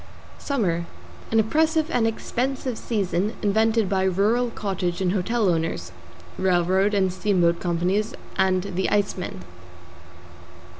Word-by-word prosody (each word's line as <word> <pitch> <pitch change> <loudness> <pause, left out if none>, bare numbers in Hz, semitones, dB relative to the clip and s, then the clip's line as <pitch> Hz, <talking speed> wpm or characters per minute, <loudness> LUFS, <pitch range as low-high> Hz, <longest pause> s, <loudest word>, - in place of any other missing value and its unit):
=SUMMER= 175 - -1 0.4
An 225 - +3
oppressive 315 +7 +2
and 230 -7 +2
expensive 250 +2 -2
season 200 -2 -1
invented 220 +1 +2
by 190 0 +1
rural 210 +6 +2
cottage 190 -5 -3
and 185 -2 +1
hotel 210 +3 0
owners, 160 - -1 0.5
railroad 190 +2 +2
and 190 -2 +2
steamboat 180 -3 +2
companies 180 +5 0 0.2
and 185 -1 +2
the 190 -1 -2
Iceman. 195 - -1
195 Hz, 110 wpm, -24 LUFS, 180-225 Hz, 0.5 s, An